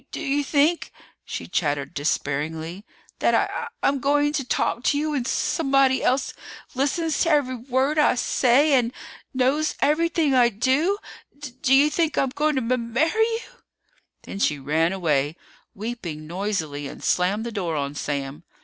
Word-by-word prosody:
"D - - -35
do - - -6
you 285 +1 0
think," 300 +4 +1 0.3
she - - -5
chattered 145 -3 -1
despairingly, 160 +5 -2 0.4
"that - - +3
I - - +4
that - - -5
I'm 280 - +3
g - - -8
going 290 +1 +2
to 295 -3 -1
talk 245 -1 -1
to 285 - +3
you 305 +1 -1
when 265 -4 -2
s - - -1
somebody 275 -4 +2
else 260 +1 +1 0.4
listens 305 +5 0
to 335 - +2
every 290 -5 +2
w 245 +2 -13
word 270 +4 +2
I 295 - +4
say 260 +4 +3
and 245 -3 +3 0.4
knows 270 +4 +1
everything 320 -1 +2
I 245 -2 +5
do? 265 - +1 0.4
D 285 -3 -8
do 265 - +4
you 290 +3 +5
think 325 -2 0
I'm 270 - +2
going 300 +3 0
to 255 -1 0
m 235 -2 -3
marry 315 +7 +2
you?" 455 +1 0 0.7
Then 195 - -7
she 150 - +1
ran 155 +5 +1
away, 155 -5 0 0.4
weeping 195 -8 -6
noisily, 165 -5 -3
and - - -10
slammed 195 +5 +1
the 235 - -4
door 180 -7 -2
on 140 -1 -2
Sam. 140 0 -4
255 Hz, 175 wpm, -24 LUFS, -, 0.7 s, I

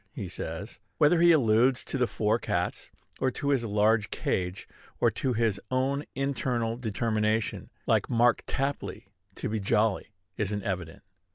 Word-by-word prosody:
he 100 - -4
says. 90 +3 -6 0.2
Whether 165 +2 +4
he 170 0 +7
alludes 125 -3 +3
to 135 - -3
the 125 - +3
four 110 +1 +1
cats, - - -2 0.3
or 130 - +2
to 140 +2 -3
his 135 -4 +2
large 105 0 +2
cage, 90 +1 -2 0.3
or - - +4
to 130 - -1
his 110 -4 0
own 135 +3 0
internal 125 -4 -1
determination, 110 -1 -1 0.2
like - - +2
Mark 120 0 +3
Tapley, 135 -7 -3 0.3
to - - -4
be 110 +1 -1
jolly, 105 +1 +1 0.3
isn't 105 -1 -1
evident. 90 -4 -4
115 Hz, 150 wpm, -28 LUFS, 105-130 Hz, 0.3 s, he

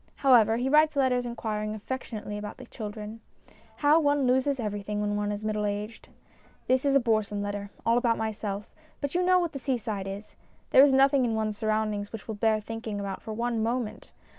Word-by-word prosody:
However, 235 -5 +5
he 250 +2 -1
writes 305 +2 +4
letters 250 -3 +2
inquiring 215 -2 -3
affectionately 215 -2 -5
about 210 0 -6
the 255 - -10
children. 215 -1 -7 0.5
How 300 +2 +4
one 290 -3 +2
loses 260 +2 +2
everything 210 -1 -3
when 205 0 -1
one 205 0 -1
is 205 +1 -5
middle 215 -1 -1
aged! 210 +2 -4 0.6
This 260 +2 +2
is 275 -1 +3
a - - +7
boresome 215 -4 0
letter, 205 0 -4 0.2
all 230 +1 +4
about 235 -2 +1
myself; 210 -2 -4 0.3
but 285 -1 -3
you 355 - +2
know 365 0 +5
what 345 -3 0
the 275 - -6
seaside 220 -7 -2
is. 200 +2 -8 0.3
There - - +8
is 280 0 +7
nothing 270 0 +4
in 230 -2 0
one's 215 -1 -2
surroundings 215 -2 -1
which 225 - -8
will 220 - -3
bear 215 +1 +2
thinking 220 -1 -5
about 200 -1 -4
for 220 - -7
one 235 0 -1
moment. 230 0 -3
220 Hz, 195 wpm, -28 LUFS, 210-260 Hz, 0.6 s, There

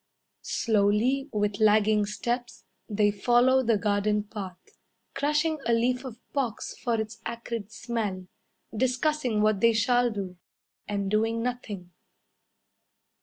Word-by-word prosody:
Slowly, 225 +6 +1
with 205 -2 -1
lagging 215 -1 +4
steps, 240 +3 -3 0.3
They 205 -1 +3
follow 245 +5 +4
the 230 -3 +2
garden 210 0 +1
path, 195 -3 -7 0.6
Crushing 305 +2 +1
a 235 - +3
leaf 250 +2 +1
of 250 -4 -7 0.2
box 255 -6 -2
for 235 -2 -1
its 220 +1 -5
acrid 230 -2 -5
smell, 220 -5 -3 0.5
Discussing 255 -1 +1
what 215 -2 +3
they 230 0 +5
shall 245 +2 +3
do, 195 -5 -5 0.5
And 200 -1 -2
doing 225 +2 +1
nothing. 215 -8 -5
225 Hz, 120 wpm, -27 LUFS, 210-245 Hz, 0.6 s, they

